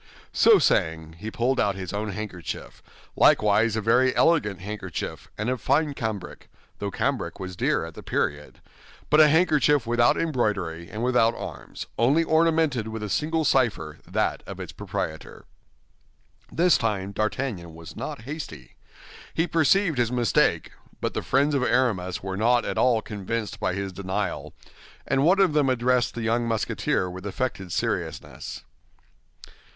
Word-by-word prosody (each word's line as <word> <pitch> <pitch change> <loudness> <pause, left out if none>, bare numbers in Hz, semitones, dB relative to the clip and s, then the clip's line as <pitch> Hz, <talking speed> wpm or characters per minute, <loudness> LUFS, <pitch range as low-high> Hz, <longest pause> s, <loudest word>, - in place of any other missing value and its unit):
So 445 - +6
saying, 80 - 0
he 105 - -5
pulled 125 +4 0
out 100 -2 +2
his 95 -1 -6
own 105 +1 -2
handkerchief, 95 -4 -6 0.3
likewise 105 +1 +4
a 110 - -1
very 125 +4 +3
elegant 150 - +2
handkerchief, 95 -3 -6
and 110 - -2
of 130 -2 -1
fine 150 +5 +2
cambric—though 105 -3 -6
cambric - - -2
was 95 -1 -6
dear - - 0
at - - -9
the - - -10
period—but 75 - -3
a 155 - +9
handkerchief 150 -4 +3
without 120 +1 +3
embroidery 105 - -1
and 110 +2 -5
without 120 -2 +3
arms, - - -7
only 140 +8 +4
ornamented 160 -7 +2
with 110 0 -5
a 105 - -4
single 160 +4 0
cipher, 110 - +1
that - - -1
of - - -8
its - - -6
proprietor. 80 0 -5 1.1
This 175 0 +3
time 100 -4 -1
D'Artagnan 110 -5 -3
was 80 0 -11
not - - -6
hasty. 125 - -8 0.6
He 165 - +2
perceived 165 -1 +2
his 120 -1 +1
mistake; 120 -6 +2 0.3
but - - -2
the - - -2
friends 140 +3 +2
of 140 - +1
Aramis 115 -9 0
were 95 -1 -3
not 120 +3 +2
at - - -2
all 120 -3 +3
convinced 105 +1 -4
by 95 -3 -1
his 100 -1 -4
denial, 95 +1 -3 0.5
and 135 - +1
one 185 +5 +4
of 190 -6 +4
them 145 -3 +3
addressed 125 0 +1
the 115 - -4
young 115 +1 +1
Musketeer 110 -4 0
with 95 +2 -7
affected 100 -4 -3
seriousness. - - -3
115 Hz, 150 wpm, -25 LUFS, 95-135 Hz, 1.1 s, a